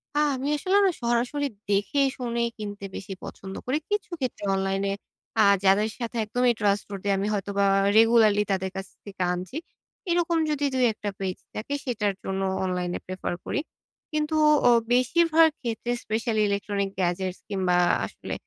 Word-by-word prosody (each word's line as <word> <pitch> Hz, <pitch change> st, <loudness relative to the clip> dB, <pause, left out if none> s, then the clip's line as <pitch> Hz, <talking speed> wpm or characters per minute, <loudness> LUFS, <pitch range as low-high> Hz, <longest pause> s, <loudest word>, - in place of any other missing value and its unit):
আ -, -, 0 dB, 0.2 s
আমি 265 Hz, +2 st, -3 dB
আসলে 375 Hz, +6 st, +2 dB
না 385 Hz, -, +5 dB
সরাসরি 240 Hz, +5 st, 0 dB, 0.2 s
দেখে 205 Hz, +8 st, +1 dB, 0.2 s
শুনে 235 Hz, -2 st, -2 dB, 0.2 s
কিনতে 205 Hz, -2 st, -6 dB
বেশি 195 Hz, 0 st, -6 dB
পছন্দ 190 Hz, 0 st, -8 dB
করি। 260 Hz, +4 st, +1 dB
কিছু 415 Hz, -3 st, -1 dB
ক্ষেত্রে 255 Hz, -6 st, -3 dB
অনলাইনে 195 Hz, +1 st, 0 dB, 0.5 s
আ -, -, +8 dB, 0.2 s
যাদের 205 Hz, +3 st, +4 dB
সাথে 235 Hz, 0 st, -4 dB
একদমই 245 Hz, +2 st, +2 dB
trustworthy 200 Hz, -1 st, -1 dB
আমি 200 Hz, +2 st, -1 dB
হয়তোবা 200 Hz, 0 st, 0 dB, 0.3 s
রেগুলারলি 220 Hz, -2 st, +5 dB
তাদের 190 Hz, 0 st, 0 dB
কাছ 195 Hz, 0 st, -5 dB, 0.2 s
থেকে 195 Hz, -2 st, -8 dB
আনছি। 185 Hz, +10 st, -5 dB, 0.5 s
এরকম 340 Hz, -1 st, +2 dB
যদি 290 Hz, -1 st, 0 dB
দুই-একটা 225 Hz, -5 st, +1 dB
পেজ 190 Hz, -2 st, -2 dB, 0.2 s
থাকে 220 Hz, +6 st, -4 dB
সেটার 210 Hz, -6 st, 0 dB
জন্য 195 Hz, 0 st, -2 dB, 0.2 s
অনলাইনে 180 Hz, -1 st, -2 dB
প্রেফার 185 Hz, -1 st, -4 dB
করি। -, -, -1 dB, 0.5 s
কিন্তু 305 Hz, +1 st, 0 dB, 0.3 s
অ -, -, +7 dB, 0.2 s
বেশিরভাগ 325 Hz, +6 st, +5 dB
ক্ষেত্রে 235 Hz, 0 st, -3 dB
specially 220 Hz, 0 st, 0 dB
electronics 200 Hz, -1 st, -1 dB
gadgets 185 Hz, +1 st, -1 dB
কিংবা 185 Hz, -3 st, +1 dB, 0.3 s
আসলে -, -, -7 dB
210 Hz, 145 wpm, -26 LUFS, 195-250 Hz, 0.5 s, আ